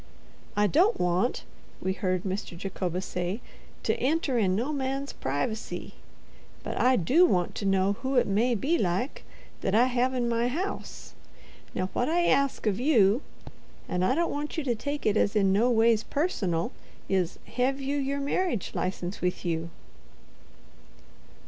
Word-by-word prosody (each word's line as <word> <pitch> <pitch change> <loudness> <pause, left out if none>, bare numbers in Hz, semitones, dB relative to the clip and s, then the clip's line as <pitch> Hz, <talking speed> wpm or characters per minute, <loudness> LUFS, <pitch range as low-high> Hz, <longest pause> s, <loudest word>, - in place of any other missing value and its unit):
"I 205 - +4
don't 355 - +3
want," 180 +7 +1 0.4
we 190 - -1
heard 185 -1 -1
Mr. 190 -2 -4
Jacobus 185 -1 -3
say, 180 +4 -3 0.4
"to - - +2
enter 290 -1 +1
in 195 -5 +2
no 250 +9 -1
man's 275 0 -2
pry 140 +2 -1
vacy; 220 0 -6 0.7
but - - -4
I 255 +1 +5
do 255 - +4
want 180 - +1
to 200 - -1
know 195 +1 +3
who 265 +1 -1
it 245 - +4
may 230 +5 +2
be, 300 +10 +1
like, 190 - -1 0.4
that 195 - 0
I 235 +3 +6
hev 255 +1 +1
in 245 -1 0
my 235 0 +1
house. 355 +11 -4 0.6
Now 185 +1 -2
what 245 - 0
I 345 +1 +2
ask 275 -3 +2
of 210 -1 +1
you, 240 -4 +4 0.7
and 180 0 -1
I 250 +8 +3
don't 340 +2 +1
want 295 +3 -4
you 320 - 0
to 250 -3 +1
take 285 +6 -4
it 215 0 +3
as 205 - +2
in 195 -2 +4
no 225 +5 +3
ways 225 -2 +4
personal, 195 - -1 0.4
is—hev 245 +8 -1
you 275 +1 -1
your 280 0 -1
merridge 280 - -1
license 180 0 -3
with 180 0 -1
you?" 165 -1 -1
230 Hz, 160 wpm, -28 LUFS, 190-275 Hz, 0.7 s, I